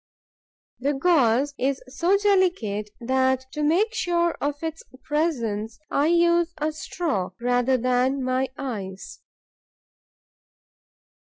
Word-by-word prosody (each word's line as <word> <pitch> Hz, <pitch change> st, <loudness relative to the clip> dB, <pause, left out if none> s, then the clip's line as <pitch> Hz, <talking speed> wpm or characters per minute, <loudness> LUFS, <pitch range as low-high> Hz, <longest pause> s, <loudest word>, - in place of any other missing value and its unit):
The 280 Hz, +3 st, 0 dB
gauze 275 Hz, -4 st, +3 dB
is 270 Hz, +1 st, 0 dB
so 335 Hz, +9 st, +2 dB
delicate 360 Hz, -, +1 dB
that, 260 Hz, +1 st, +1 dB
to 300 Hz, -, -4 dB
make 360 Hz, +10 st, +2 dB
sure 345 Hz, -6 st, +1 dB
of 285 Hz, 0 st, 0 dB
its 320 Hz, 0 st, -4 dB, 0.2 s
presence, 230 Hz, -9 st, -1 dB
I 285 Hz, +2 st, +2 dB
use 340 Hz, 0 st, +3 dB
a 305 Hz, 0 st, -1 dB
straw 295 Hz, -, -3 dB
rather 245 Hz, +2 st, +2 dB
than 255 Hz, +2 st, +1 dB
my 255 Hz, +1 st, 0 dB
eyes. 195 Hz, -8 st, -6 dB
275 Hz, 105 wpm, -24 LUFS, 245-340 Hz, 0.2 s, gauze